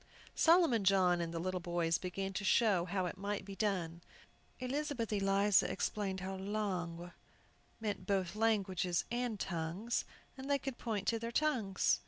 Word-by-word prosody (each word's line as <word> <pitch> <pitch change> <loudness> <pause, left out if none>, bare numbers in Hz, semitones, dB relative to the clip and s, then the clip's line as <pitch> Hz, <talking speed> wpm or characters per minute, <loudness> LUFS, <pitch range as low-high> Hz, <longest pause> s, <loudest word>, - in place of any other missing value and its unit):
Solomon 325 - +4
John 185 -2 +4
and 165 -1 -3
the 170 - -4
little 185 +2 -2
boys 170 -1 0
began 195 +1 -4
to 195 - -3
show 200 -4 +3
how 185 0 -1
it 180 +1 -5
might 200 +1 -3
be 195 0 -7
done. 180 -5 -1 0.6
Elizabeth 255 -3 -2
Eliza 195 0 +3
explained 190 0 -2
how 190 +1 -4
"langues" 185 -4 -3 0.7
meant 215 -2 -3
both 190 -2 0
"languages" 190 -6 +1
and 240 -3 -1
"tongues," 175 +7 -2 0.3
and 265 +1 -8
they 280 - +4
could 270 -2 -6
point 215 -4 -2
to 230 - 0
their 230 +1 -4
tongues. 235 -9 +1
195 Hz, 155 wpm, -35 LUFS, 180-225 Hz, 0.7 s, Solomon